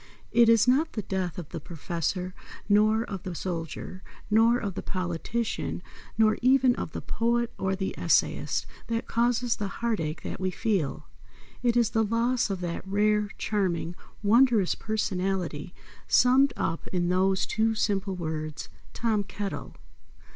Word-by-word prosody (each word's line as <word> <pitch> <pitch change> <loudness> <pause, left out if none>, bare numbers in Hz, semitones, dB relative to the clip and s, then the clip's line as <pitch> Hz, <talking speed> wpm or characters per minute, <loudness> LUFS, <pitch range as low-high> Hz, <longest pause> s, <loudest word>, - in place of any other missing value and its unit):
It 235 -1 +5
is 230 +1 +5
not 285 +6 +3
the 215 - -3
death 190 -1 -3
of 170 -5 -6
the 165 - -5
Professor, 170 +3 -3 0.3
nor 215 +2 +4
of 195 -5 -6
the 185 -2 -6
soldier, 170 +1 -5 0.3
nor 225 +3 +5
of 200 -5 -3
the - - -4
politician 185 +3 -3 0.3
nor 215 -1 +4
even 255 0 +5
of - - -5
the - - -4
poet 235 +1 0
or 190 0 0
the 190 0 -3
essayist - - +1 0.2
that 230 0 -2
causes 240 0 +1
the 205 - -2
heart 230 +2 -2
ache 155 0 -4
that - - -5
we 185 0 0
feel. 185 - -1 0.6
It 240 -1 +2
is 235 -3 +3
the 225 - +2
loss 230 +2 +1
of 190 -2 -3
that 170 -1 -3
rare, 210 +1 +2
charming, 180 -5 -1 0.3
wondrous 225 -2 +4
personality 185 -6 -2 0.4
summed 260 +2 +5
up 165 0 -2
in 175 -1 0
those 190 +1 +2
two 225 +1 +1
simple 200 -2 0
words, 155 -3 -4 0.3
TOM 220 -3 +1
KETTLE. 200 0 -5
205 Hz, 150 wpm, -27 LUFS, 180-230 Hz, 0.6 s, It